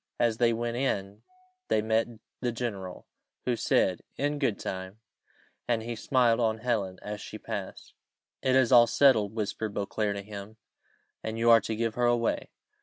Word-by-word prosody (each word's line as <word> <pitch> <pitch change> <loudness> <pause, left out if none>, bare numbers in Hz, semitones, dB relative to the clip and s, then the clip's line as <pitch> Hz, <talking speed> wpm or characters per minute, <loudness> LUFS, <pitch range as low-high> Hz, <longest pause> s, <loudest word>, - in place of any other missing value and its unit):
As 115 -2 +2
they 120 -1 +4
went 115 +1 -2
in, 100 -6 -2 0.5
they - - +2
met 110 +1 +2 0.3
the 125 - -1
general, 105 -6 -5 0.4
who 125 - +1
said, 95 -5 +1 0.2
"In 145 +1 -1
good 125 -8 +1
time;" 95 +3 -6 0.7
and 115 -2 +1
he 120 +1 -4
smiled 120 -1 +2
on 110 -2 +1
Helen 110 -5 -1
as 105 0 -5
she - - -7
passed. - - -6 0.5
"It 130 -1 +2
is 130 -1 +4
all 120 -2 +8
settled," 110 -5 +4
whispered 110 -1 -3
Beauclerc 100 0 -1
to 100 - -5
him; 105 +1 -9 0.7
"and 110 0 -4
you 115 +1 +4
are 115 -1 +7
to 110 +2 -3
give 115 0 -1
her 120 +1 +1
away." 120 -1 +1
115 Hz, 170 wpm, -28 LUFS, 105-120 Hz, 0.7 s, all